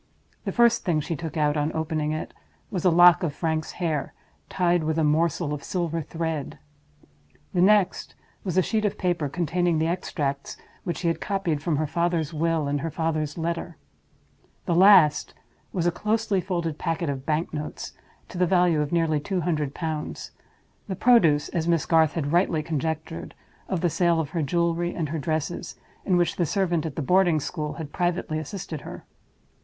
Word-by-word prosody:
The - - -1
first 235 -1 +4
thing 170 -5 +1
she 165 +3 -3
took 160 0 -6
out, 150 -1 +2
on 150 +1 0
opening 155 -1 -1
it, 155 - -4 0.4
was 185 -4 -2
a 185 - +5
lock 175 +1 +7
of 160 -5 -2
Frank's 160 -1 -2
hair, 160 -6 -2 0.3
tied 175 -2 +1
with 160 +1 -1
a 160 - +2
morsel 155 0 +1
of 145 -1 -5
silver 170 -3 -2
thread; 160 -2 -4 1.0
the 180 - +2
next 205 0 +3 0.3
was 185 -2 -2
a 185 - +5
sheet 220 +2 0
of 210 - 0
paper 175 -5 0
containing 175 +2 0
the 160 - +1
extracts 145 -5 -3 0.3
which 175 - -2
she 175 - -2
had 165 - 0
copied 190 -7 -1
from 160 0 0
her 155 +2 0
father's 170 0 -1
will 160 -1 0
and 145 0 -1
her 165 - -2
father's 155 -1 -2
letter; 170 0 -3 0.9
the 175 - 0
last 175 -5 +6 0.4
was 175 -3 -1
a 175 - +3
closely 215 +1 0
folded 170 -4 -3
packet 165 0 -1
of 135 -2 -3
bank 155 +2 -1
notes, 150 0 -5 0.3
to 180 - -8
the 180 - +3
value 175 -3 +3
of 145 - -2
nearly 165 -3 +2
two 185 +4 -2
hundred 150 -4 -1
pounds—the 160 +4 -7
produce 170 -11 +4
(as 165 -2 -2
Miss 170 -2 +2
Garth 160 -2 +3
had 145 -3 -2
rightly 170 -3 +2
conjectured) 155 - -4 0.3
of 180 -4 -1
the 175 - +2
sale 170 0 +2
of 155 -3 -3
her 170 - -1
jewelry 170 +3 0
and 160 -4 -2
her 160 +1 -3
dresses, 155 +3 -3 0.3
in 185 -2 +2
which 175 -1 +1
the 175 - +2
servant 175 -3 0
at 145 - -7
the 155 - -2
boarding 180 0 +3
school 150 0 -4
had 155 -3 -8
privately 175 -3 -1
assisted 165 -2 -6
her. - - -9
165 Hz, 180 wpm, -25 LUFS, 155-175 Hz, 1.0 s, lock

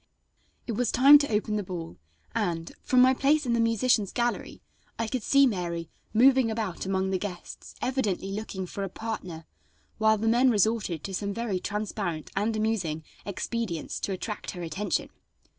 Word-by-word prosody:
It - - -3
was 230 +1 0
time 280 +3 +8
to 285 -3 -2
open 210 0 0
the 205 - -2
ball, 175 -3 -7 0.3
and, 165 -1 -2
from 255 -1 +4
my 260 +1 +6
place 290 +3 +2
in 240 - +1
the 235 - +2
musicians' 230 -2 +2
gallery, 240 0 -2 0.3
I 230 - -1
could 255 +2 -2
see 275 +5 +5
Mary 170 -7 -2 0.2
moving 255 +1 +5
about 215 -5 -3
among 190 0 0
the 190 - 0
guests, 180 -3 -7
evidently 220 -7 -1
looking 195 -2 -4
for 195 +2 -5
a 195 - -3
partner, 180 -6 -6 0.5
while 220 0 +4
the 225 +2 -1
men 245 +3 +5
resorted 210 -7 +1
to 195 - -5
some 200 +1 -2
very 230 -5 -1
transparent 200 -6 -3
and 210 +3 0
amusing 200 -8 -1 0.2
expedients 200 -3 -3
to - - -3
attract 210 +3 -4
her 175 -2 -5
attention. 180 +6 -2
210 Hz, 170 wpm, -27 LUFS, 185-235 Hz, 0.5 s, time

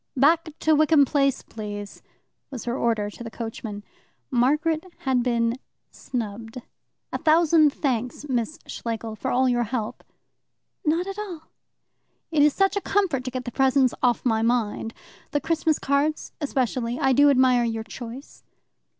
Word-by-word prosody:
"Back 315 +3 +3
to 315 - +4
Wickham 305 -1 +5
Place, 275 -1 +1
please!" 205 -2 -7 0.5
was 260 -5 -6
her 240 0 -1
order 225 -5 0
to 235 - -10
the 230 - -6
coachman. 220 -2 -6 0.5
Margaret 300 +6 +2 0.2
had 260 -2 +1
been 235 -1 +1 0.3
snubbed. 225 0 -5 0.5
"A - - -1
thousand 320 -1 +5
thanks, 255 -1 -2
Miss 250 +2 -1
Schlegel, 225 -1 -5
for - - -3
all 260 +1 +3
your 240 -1 +1
help." 225 -2 -4 0.8
"Not 330 +3 +1
at 390 +1 -6
all." 350 -7 -7 0.8
"It 310 -3 +3
is 300 +1 +6
such 390 +5 +2
a 405 - 0
comfort 370 -12 0
to - - -1
get 255 0 -5
the 245 - -4
presents 265 0 +3
off 245 0 +2
my 220 -2 +2
mind 225 -1 0 0.3
the 290 - 0
Christmas 320 -1 +1
cards 280 +3 0
especially. 250 -4 -1
I 265 0 +3
do 285 +3 +6
admire 255 -3 +4
your 225 -1 -2
choice." 240 +5 -9
255 Hz, 150 wpm, -25 LUFS, 230-300 Hz, 0.8 s, is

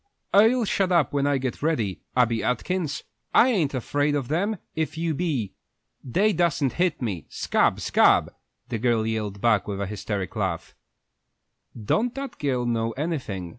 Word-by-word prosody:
"I'll 225 +4 +5
shut 195 -2 0
up 170 -7 +3
when 140 0 +1
I 145 -1 +2
get 130 -2 -4
ready, 115 - -1 0.2
Abby 115 -2 +2
Atkins! 150 +5 -1 0.3
I 250 - +7
ain't 165 - +1
afraid 145 +4 0
of 135 -4 -2
them 200 +8 0 0.2
if 160 0 -2
you 165 0 0
be. 140 - -2 0.5
They 200 - +2
dassen't 160 -6 +1
hit 175 -6 0
me. 95 -9 -3
Scab, - - +1
scab!" - - +3 0.4
the 115 -3 -2
girl 115 -2 +1
yelled 105 -3 -3
back, 110 -5 +2
with 100 -1 -4
a 100 - -1
hysteric 100 -1 -4
laugh. 95 -6 -3 1.1
"Don't 220 - 0
that 275 -2 -6
girl 130 -4 0
know 115 -1 0
anything?" 130 - -3
135 Hz, 160 wpm, -25 LUFS, 110-170 Hz, 1.1 s, I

